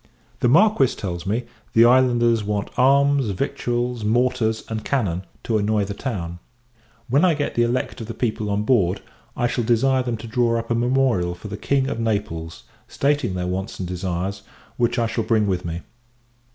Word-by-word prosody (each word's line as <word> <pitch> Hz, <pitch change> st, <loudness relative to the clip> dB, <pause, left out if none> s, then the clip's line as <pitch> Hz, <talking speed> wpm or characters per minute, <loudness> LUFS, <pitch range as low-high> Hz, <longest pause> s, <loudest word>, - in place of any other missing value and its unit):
The -, -, +2 dB
Marquis 165 Hz, -, +4 dB
tells 90 Hz, -3 st, -5 dB
me, 110 Hz, +5 st, 0 dB, 0.3 s
the 115 Hz, +1 st, +7 dB
islanders 120 Hz, -2 st, +4 dB
want 105 Hz, 0 st, -2 dB
arms, 140 Hz, 0 st, +4 dB
victuals, 120 Hz, +1 st, -2 dB
mortars, 115 Hz, 0 st, +1 dB
and 110 Hz, -1 st, -4 dB
cannon, 95 Hz, -9 st, -1 dB, 0.2 s
to 110 Hz, -2 st, +1 dB
annoy 105 Hz, 0 st, +1 dB
the 100 Hz, -, -5 dB
town. 90 Hz, -8 st, -5 dB, 0.7 s
When 140 Hz, +6 st, +3 dB
I 175 Hz, -3 st, +4 dB
get 145 Hz, -1 st, -2 dB
the 120 Hz, -, +1 dB
elect 120 Hz, +1 st, -1 dB
of 110 Hz, -, -6 dB
the 115 Hz, -, -6 dB
people 110 Hz, -3 st, -2 dB
on 100 Hz, +1 st, 0 dB
board, 100 Hz, -6 st, +2 dB, 0.4 s
I 120 Hz, -, +1 dB
shall 120 Hz, 0 st, 0 dB
desire 130 Hz, +3 st, +2 dB
them 120 Hz, -2 st, -2 dB
to 110 Hz, -, -9 dB
draw 115 Hz, +1 st, +1 dB
up 115 Hz, +1 st, -4 dB
a -, -, +4 dB
memorial 120 Hz, -7 st, +1 dB
for 105 Hz, +4 st, -9 dB
the 100 Hz, -, -5 dB
King 135 Hz, +5 st, 0 dB
of 115 Hz, -, -3 dB
Naples, 100 Hz, -8 st, -3 dB, 0.2 s
stating 140 Hz, -8 st, 0 dB
their 90 Hz, -1 st, -2 dB
wants 95 Hz, +3 st, -3 dB
and 90 Hz, -, -4 dB
desires, 90 Hz, +2 st, -3 dB, 0.3 s
which 120 Hz, +1 st, 0 dB
I 115 Hz, -, +2 dB
shall 115 Hz, 0 st, -1 dB
bring 110 Hz, -2 st, +2 dB
with 90 Hz, -3 st, -1 dB
me. 85 Hz, +1 st, -4 dB
115 Hz, 185 wpm, -22 LUFS, 100-125 Hz, 0.7 s, the